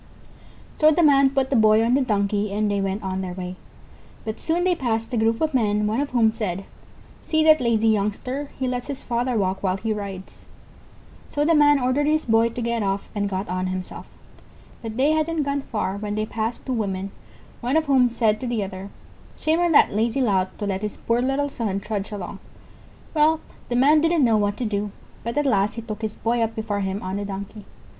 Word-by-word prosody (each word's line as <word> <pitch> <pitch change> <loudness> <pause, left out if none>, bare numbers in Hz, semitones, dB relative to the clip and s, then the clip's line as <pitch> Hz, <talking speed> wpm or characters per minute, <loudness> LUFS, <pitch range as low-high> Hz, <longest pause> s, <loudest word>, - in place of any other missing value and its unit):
So 310 - +6
the 335 +3 +3
Man 275 -2 +6
put 270 0 0
the - - +3
Boy 220 -1 +5
on 235 - +2
the 275 - +3
Donkey 205 -3 0
and 210 +1 0
they 200 -1 0
went 195 +2 -2
on 190 0 -2
their 180 -1 -5
way. 180 0 -5 0.7
But 220 0 -4
soon 335 +2 0
they 365 0 +3
passed 230 -7 -2
a - - +1
group 225 +1 +2
of 315 -2 +1
men, 210 -4 +1
one 215 +4 0
of 285 - -2
whom 230 -3 +3
said: 195 -4 -3 0.6
"See 315 -1 +1
that 310 -2 +6
lazy 225 -2 +2
youngster, 220 +7 -1
he 265 - -1
lets 250 -1 -3
his 280 -2 -5
father 240 0 -1
walk 190 -1 0
while 185 -1 0
he 220 +2 -2
rides." 195 -2 -8 0.8
So 295 0 0
the 330 - +4
Man 290 -2 +5
ordered 255 +3 +1
his 310 +1 +1
Boy 225 0 +3
to 235 +1 -5
get 235 -1 -1
off, 195 0 -2
and 205 -1 -1
got 190 +1 -3
on 185 +1 -2
himself. 185 0 -6 0.7
But 225 -1 -6
they 280 +4 +3
hadn't 315 0 0
gone 280 0 -1
far 210 -6 -3
when 205 0 -4
they 215 0 -1
passed 225 +2 -4
two 260 - -2
women, 195 -4 -2 0.5
one 255 +6 +1
of 320 - +1
whom 260 -4 +4
said 220 -2 +1
to 255 - -4
the 235 -3 -1
other: 190 0 -7 0.5
"Shame 315 +2 +1
on 350 -1 +2
that - - +5
lazy 230 +5 0
lout 190 -6 +1
to 210 - -3
let 195 -1 -2
his 210 -1 -4
poor 235 +1 0
little 270 +3 0
son 220 -8 -2
trudge 205 0 -4
along." 200 -1 -6 0.7
Well, 310 0 +3 0.3
the 240 - -1
Man 290 +5 +5
didn't 330 -3 +3
know 225 -2 +3
what 205 -1 0
to 250 - -2
do, 205 -1 -2 0.3
but 235 +3 -4
at 295 - +2
last 205 -6 +2
he 230 - -4
took 220 -1 -6
his 220 -1 -3
Boy 235 +1 0
up 225 0 -1
before 215 -2 -2
him 195 +1 -3
on 185 +1 -3
the 205 - -3
Donkey. 200 +1 -7
225 Hz, 220 wpm, -23 LUFS, 200-270 Hz, 0.8 s, So